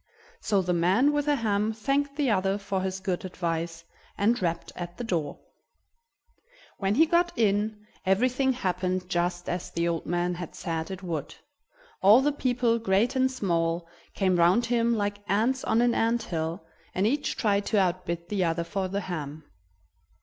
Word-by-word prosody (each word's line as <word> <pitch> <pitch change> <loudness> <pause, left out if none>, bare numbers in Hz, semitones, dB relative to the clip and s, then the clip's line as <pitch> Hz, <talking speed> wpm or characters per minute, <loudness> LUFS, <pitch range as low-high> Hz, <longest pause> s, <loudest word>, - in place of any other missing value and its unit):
So 200 -3 +1
the 180 0 0
man 190 +12 +3
with 295 0 0
the 295 - +4
ham 215 -3 0
thanked 280 +5 -1
the 285 -5 +1
other 195 0 +1
for 200 -2 -2
his 190 0 -3
good 185 -2 -2
advice, 165 -2 -3 0.3
and 225 +3 +2
rapped 170 -1 -2
at 175 0 -7
the - - -4
door. 170 -9 -2 1.4
When 195 +1 +1
he 320 +6 +6
got 345 +1 +2
in, 210 -1 +1 0.2
everything 255 +7 +2
happened 185 -4 -1
just 175 0 -1
as 175 0 -3
the 170 0 -1
old 170 -1 -2
man 175 +1 0
had 175 -1 -7
said 165 0 -3
it 190 0 -7
would: 160 -5 -4 0.7
all 205 +5 +8
the 295 - +3
people, 245 -4 +1
great 225 +4 +1
and 260 0 +3
small, 170 -7 -1 0.3
came 185 -3 +2
round 175 +8 +4
him 235 -1 +2
like 205 -1 -1
ants 235 +6 +1
on 225 +2 +3
an 240 -1 +3
ant 230 0 +1
hill, 165 -2 -3 0.3
and 190 - +1
each 285 +6 0
tried 205 -2 +1
to 210 - +2
outbid 175 -2 -1
the 200 -3 0
other 170 0 0
for 190 +2 -2
the 200 +2 -2
ham. 155 -4 -5
195 Hz, 170 wpm, -27 LUFS, 175-230 Hz, 1.4 s, all